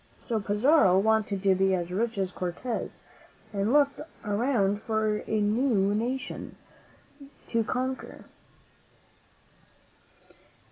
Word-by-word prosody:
So 230 -3 0
Pizarro 210 - +4
wanted 210 -1 +1
to 195 -1 +5
be 190 0 +2
as 175 -1 -4
rich 225 +4 -1
as 190 -2 -1
Cortez, 185 +7 -4 0.5
and 200 0 0
he - - +1
looked 285 0 +3 0.3
around 205 -2 +1
for 220 -1 0
a 220 - 0
new 210 -2 +2
nation 245 +5 -3 0.9
to 230 -1 +1
conquer. 260 +3 -4
215 Hz, 105 wpm, -27 LUFS, 195-240 Hz, 0.9 s, to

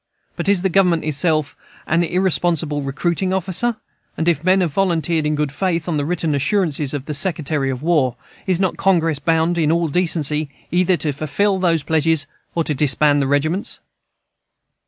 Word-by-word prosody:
But - - -2
is 195 -3 +2
the 190 - +2
Government 180 -3 +2
itself 155 0 0 0.3
an 165 +1 +1
irresponsible 170 -4 0
recruiting 170 +7 -1
officer? 190 +6 0 0.4
and 165 - -2
if 165 -3 +1
men 185 +2 +3
have 170 -5 -1
volunteered 165 -4 +1
in 150 - 0
good 150 -2 -1
faith 170 +1 -2
on 165 -3 -1
the 145 - -1
written 165 -1 -1
assurances 150 -1 0
of 140 -1 -5
the 155 - -4
Secretary 150 -3 0
of 130 +1 -4
War, 150 -7 +2 0.3
is 185 -2 +1
not 190 -3 0
Congress 165 -6 +1
bound, 165 +2 +1
in 155 -1 +2
all 170 -1 +1
decency, 155 -3 0 0.2
either 180 0 +2
to 155 - -1
fulfill 190 +8 -1
those 165 -4 +1
pledges 160 -1 +1 0.3
or 165 - +1
to 155 - -1
disband 145 +1 +2
the 135 - 0
regiments? 155 +8 -1
165 Hz, 175 wpm, -19 LUFS, 150-180 Hz, 0.4 s, men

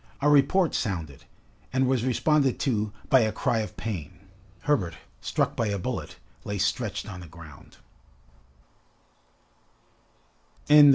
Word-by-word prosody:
A 145 - +1
report 150 +5 +4
sounded 80 - -3 0.5
and 130 +1 +2
was 130 -3 +1
responded 135 +1 +2
to 110 -6 0 0.2
by 135 -3 +7
a 110 -2 +2
cry 125 -1 0
of 105 -4 -5
pain. 95 -10 -5 0.4
Herbert, 95 - +1 0.2
struck - - 0
by 115 - 0
a 100 -1 -1
bullet, 90 - -4 0.3
lay 105 0 -3
stretched 105 +2 -1
on 95 -3 -7
the 90 - -10
ground. 80 -3 -14
110 Hz, 120 wpm, -27 LUFS, 90-130 Hz, 0.5 s, by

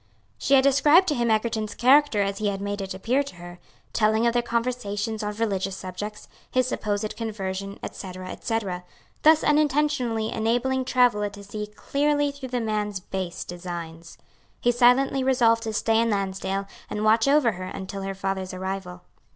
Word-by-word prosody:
She 275 - +3
had 265 - +5
described 295 +6 +5
to - - +2
him 240 -4 0
Egerton's 220 -1 0
character 260 -4 +4
as 195 0 -3
he 215 - 0
had 195 -1 -1
made 200 0 -3
it 190 -1 -5
appear 240 +8 +1
to 280 -7 -7
her, 175 0 -11 0.3
telling 220 +1 +2
of 235 - +3
their 240 - +2
conversations 230 -3 -2
on 210 0 -3
religious 195 -3 -1
subjects, 200 +3 -7 0.2
his 255 0 +2
supposed 210 -3 -2
conversion, 200 -3 -4
etc., 185 -1 -7
etc.; 200 -6 -3 0.4
thus 315 0 +6
unintentionally 290 -7 +1
enabling 245 +4 0
Travilla 245 -5 +3
to 200 0 -12
see 210 +1 -5
clearly 290 +6 0
through 280 -2 -8
the 245 0 -1
man's 210 -2 -2
base 185 -1 -5
designs. 170 -2 -7 0.4
He 240 - +3
silently 255 +2 +4
resolved 240 -3 +3
to 220 - -2
stay 225 +1 +2
in 230 - +1
Lansdale 195 -1 -2 0.2
and 210 - -3
watch 220 +3 +4
over 280 -4 +4
her 185 -1 -7
until 190 +1 -6
her 195 0 -4
father's 190 -1 -3
arrival. 185 -1 -5
215 Hz, 165 wpm, -25 LUFS, 195-250 Hz, 0.4 s, thus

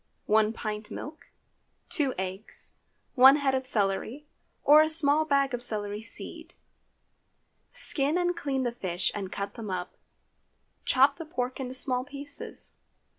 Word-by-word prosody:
1 215 0 +3
pint 215 -1 -5
milk. 305 +6 -8 0.6
2 285 -6 0
eggs. 190 +3 -4 0.4
1 265 +2 +8
head 280 -2 +1
of 260 0 +1
celery, 220 +6 0 0.4
or 300 +2 +8
a 310 - +2
small 310 -1 +3
bag 275 -3 +2
of 245 - -2
celery 210 -3 -2
seed. 230 - -8 1.2
Skin 290 +2 +2
and 355 0 +1
clean 275 -5 -1
the 240 - 0
fish 185 -5 -1
and 195 -3 -5
cut 200 +1 -4
them 225 -4 -7
up. 180 -1 -4 0.9
Chop 275 +2 +4
the - - -5
pork 255 -4 -3
into 260 -1 -4
small 255 -1 0
pieces. 285 +1 -7
255 Hz, 140 wpm, -28 LUFS, 210-285 Hz, 1.2 s, 1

